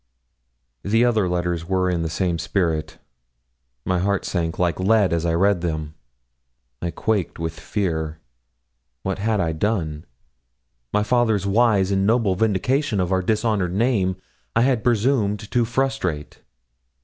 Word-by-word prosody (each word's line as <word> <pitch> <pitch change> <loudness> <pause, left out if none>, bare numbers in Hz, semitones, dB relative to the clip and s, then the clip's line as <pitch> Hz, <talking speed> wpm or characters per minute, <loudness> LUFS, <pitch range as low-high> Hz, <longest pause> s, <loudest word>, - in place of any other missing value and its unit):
The 115 - +2
other 110 -6 +2
letters 85 -1 -1
were 95 -1 +1
in 90 -2 0
the 80 - -2
same 85 +1 -1
spirit. 80 -6 -1 0.9
My 90 -1 +1
heart 100 +1 0
sank 85 -2 -2
like 85 -2 0
lead 100 -1 +3
as 85 0 0
I 85 - +1
read 95 0 +2
them. 80 -3 -3 0.9
I 85 - -2
quaked 105 +1 -1
with 80 0 -4
fear. 80 -7 -2 0.9
What 95 0 -2
had 110 +1 0
I 85 -2 +1
done? 80 -3 -2 0.9
My 105 - +2
father's 110 -4 +2
wise 100 -2 +3
and 95 0 +2
noble 115 -4 +3
vindication 110 +5 +1
of 90 0 0
our 95 0 +2
dishonoured 105 -3 0
name 100 -5 +1 0.4
I 115 - +4
had 125 -3 +2
presumed 110 -3 +1
to 120 -1 +2
frustrate. 120 - -2
95 Hz, 140 wpm, -22 LUFS, 85-110 Hz, 0.9 s, I